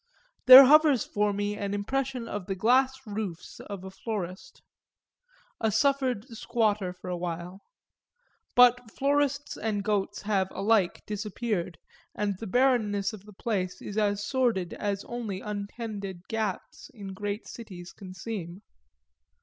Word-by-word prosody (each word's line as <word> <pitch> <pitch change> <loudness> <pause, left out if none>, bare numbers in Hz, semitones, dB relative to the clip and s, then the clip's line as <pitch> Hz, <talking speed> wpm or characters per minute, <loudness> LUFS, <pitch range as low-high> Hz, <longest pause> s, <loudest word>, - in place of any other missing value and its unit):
There 260 +2 +13
hovers 295 -3 +5
for 210 0 0
me 205 +1 -2
an 200 -1 -3
impression 255 +3 -2
of 205 -4 -5
the 195 - -2
glass 255 +6 +3
roofs 205 -5 -6
of 200 -3 -8
a 190 - -8
florist, 190 -2 -6 1.0
a 220 -1 +1
suffered 255 -1 +1
squatter 215 -4 0
for 180 0 -12
a 180 - -2
while; 175 +2 -5 0.9
but 245 -1 +5
florists 285 +2 0
and 210 -2 -2
goats 205 -1 -1
have 200 -3 +1
alike 200 -3 +2
disappeared 210 -4 -3 0.4
and 205 -1 -1
the 225 - -6
barrenness 215 -3 +2
of 205 -2 -11
the 210 - -13
place 190 -3 -2
is 205 - -7
as 205 -1 0
sordid 230 -8 0
as 200 -1 -3
only 225 -6 -4
untended 200 -2 -6
gaps 220 -1 -4
in 195 -3 -7
great 205 +2 -4
cities 185 -6 -10
can 185 -2 -11
seem. 190 -1 -6
210 Hz, 135 wpm, -28 LUFS, 195-235 Hz, 1.0 s, There